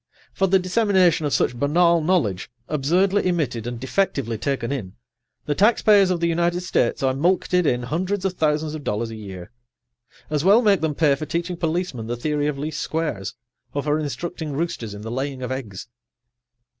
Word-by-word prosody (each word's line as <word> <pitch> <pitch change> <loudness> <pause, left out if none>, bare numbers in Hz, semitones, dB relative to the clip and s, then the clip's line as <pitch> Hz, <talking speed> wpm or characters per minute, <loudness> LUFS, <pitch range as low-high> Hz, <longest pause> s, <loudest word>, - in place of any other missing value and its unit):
For 195 - +1
the 190 +1 +4
dissemination 185 -4 +2
of - - -3
such 125 - +1
banal 170 +6 +3
knowledge, 155 - 0 0.2
absurdly 180 +7 +1
emitted 135 -10 -1
and 120 -1 -5
defectively 130 - -1
taken 130 0 -2
in, 105 -9 -5 0.5
the 150 - 0
taxpayers 205 +1 +4
of 180 -2 0
the 170 - +1
United 170 +1 +1
States 140 -8 0
are 130 -1 +2
mulcted 180 +3 +1
in 125 -2 +1
hundreds 185 +8 -2
of 190 - 0
thousands 155 -2 0
of 155 -2 -6
dollars 115 0 -2
a - - -6
year. 95 -4 -9 0.8
As 150 -1 0
well 205 +6 +6
make 200 -5 +4
them 155 -2 -1
pay 150 -2 +3
for 150 +2 -4
teaching 170 +1 -2
policemen 165 -8 -2
the 120 +1 -3
theory 150 +3 -1
of 150 -2 -2
least 150 +2 -4
squares, 155 - -3 0.4
or 145 - -1
for 150 +1 +1
instructing 155 +2 -4
roosters 135 -9 -3
in 105 - -9
the 110 - -5
laying 135 +1 -3
of 125 - -4
eggs. 110 -7 -6
150 Hz, 180 wpm, -23 LUFS, 130-180 Hz, 0.8 s, well